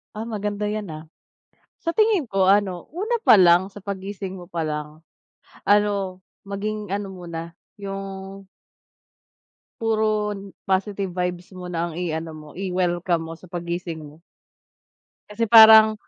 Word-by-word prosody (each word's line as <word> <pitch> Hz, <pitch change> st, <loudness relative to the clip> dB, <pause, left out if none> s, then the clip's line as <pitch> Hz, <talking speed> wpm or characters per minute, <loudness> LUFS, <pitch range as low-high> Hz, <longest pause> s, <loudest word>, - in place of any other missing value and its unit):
Ah, 215 Hz, +1 st, -4 dB
maganda 210 Hz, -2 st, -3 dB
'yan, 210 Hz, -3 st, -3 dB
ah. 155 Hz, 0 st, -7 dB, 0.8 s
Sa 335 Hz, 0 st, -1 dB
tingin 430 Hz, -, +3 dB
ko 195 Hz, -3 st, +1 dB
ano, 195 Hz, -3 st, +1 dB
una 415 Hz, +9 st, -2 dB
pa -, -, +7 dB
lang, 180 Hz, +2 st, +5 dB
sa 205 Hz, -, -11 dB
paggising 195 Hz, -1 st, -5 dB
mo 175 Hz, -, -10 dB
pa 170 Hz, -2 st, -2 dB
lang 150 Hz, 0 st, -5 dB, 0.7 s
ano, 200 Hz, -2 st, +2 dB, 0.2 s
maging 205 Hz, +1 st, -4 dB
ano 200 Hz, 0 st, -2 dB
muna 170 Hz, -2 st, -7 dB, 0.3 s
yung 195 Hz, 0 st, -7 dB, 1.4 s
puro 220 Hz, -1 st, +1 dB, 0.6 s
positive 195 Hz, +1 st, 0 dB
vibes 180 Hz, 0 st, -2 dB
muna 180 Hz, -2 st, -5 dB
ang 170 Hz, -, -7 dB
i-ano 165 Hz, -2 st, -3 dB
mo, 150 Hz, -1 st, -11 dB
i-welcome 175 Hz, -2 st, 0 dB
mo -, -, -5 dB
sa 185 Hz, -, -14 dB
paggising 170 Hz, -1 st, -4 dB
mo. 150 Hz, +1 st, -13 dB, 1.1 s
Kasi 230 Hz, +2 st, -1 dB
parang 220 Hz, 0 st, +9 dB
195 Hz, 130 wpm, -23 LUFS, 175-210 Hz, 1.4 s, parang